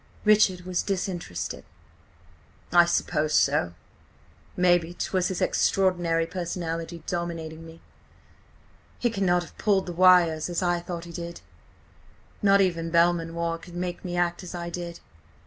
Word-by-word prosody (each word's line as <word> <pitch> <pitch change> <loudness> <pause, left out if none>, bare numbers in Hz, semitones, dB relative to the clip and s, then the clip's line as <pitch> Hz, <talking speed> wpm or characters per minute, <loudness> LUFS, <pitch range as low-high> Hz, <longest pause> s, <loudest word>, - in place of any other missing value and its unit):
Richard 210 -4 +4
was 180 0 -2
disinterested. 180 - -4 1.1
"I 175 -1 +7
suppose 155 -3 0
so. 140 -14 +2 0.8
Mayhap 175 -1 +2
'twas 185 -2 0
his 185 - -2
extraordinary 175 -4 +1
personality 165 -1 -4
dominating 165 -2 -4
me. 165 0 -14 1.2
He 240 - 0
cannot 180 -4 +1
have 170 - -15
pulled 195 -3 +2
the 175 - -5
wires 175 -3 +5
as 175 +1 -1
I 175 -1 +1
thought 170 0 -6
he 170 - -10
did. 170 0 -7 1.0
Not 200 -1 +5
even 170 -3 0
Belmanoir 170 0 +1
could 175 +1 -13
make 175 0 -4
me 175 -1 -4
act 175 0 0
as 180 -1 -8
I 170 0 -5
did. 170 -1 -6
175 Hz, 130 wpm, -26 LUFS, 165-180 Hz, 1.2 s, I